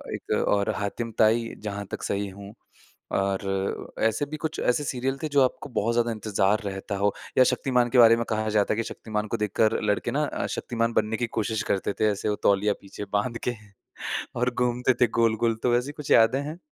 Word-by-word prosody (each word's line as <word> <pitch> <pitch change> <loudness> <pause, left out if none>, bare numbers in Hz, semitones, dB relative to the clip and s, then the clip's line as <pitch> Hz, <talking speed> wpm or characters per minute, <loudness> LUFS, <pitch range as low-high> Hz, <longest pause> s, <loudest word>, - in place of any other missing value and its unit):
एक - - -9 0.2
और 100 -1 +2
हातिमताई 115 +2 +1
जहाँ 100 -1 -4
तक - - -5
सही 100 0 -1
हूँ 100 +1 -11 0.6
और 95 0 -2
ऐसे 115 +5 +2
भी 155 +2 -6
कुछ 160 0 -4
ऐसे 125 +4 +1
सीरियल 135 0 -2
थे - - 0
जो 140 - +6
आपको 130 +3 -2
बहुत 115 -2 0
ज़्यादा 120 0 +2
इंतज़ार 105 -1 +1
रहता 95 0 -4
हो 100 +1 +1 0.2
या 130 - +8
शक्तिमान 125 -2 +1
के 125 - +1
बारे 115 -1 +8
में 115 - -1
कहा 110 0 -1
जाता 105 -1 +2
है - - -4
कि 115 - 0
शक्तिमान 105 -1 -4
को 115 - -2
देखकर 105 +1 +1
लड़के 105 +3 0
ना 150 +3 +1
अ, - - -3
शक्तिमान 115 -1 -2
बनने 110 0 +1
की 120 - -1
कोशिश 110 0 -1
करते 100 0 0
थे। 110 - +4
ऐसे 100 +1 -2
वो 105 - +1
तौलिया 100 +1 +3
पीछे 100 +1 -8
बाँध 115 +3 0
के - - +3 0.9
और 125 +1 +2
घूमते 125 +1 +1
थे - - +8
गोल-गोल। 115 0 +2
तो 125 - +2
वैसी 125 +4 +1
कुछ 150 -1 -8
यादें 115 +4 +5
हैं? 155 +4 -6
110 Hz, 205 wpm, -26 LUFS, 105-125 Hz, 0.9 s, या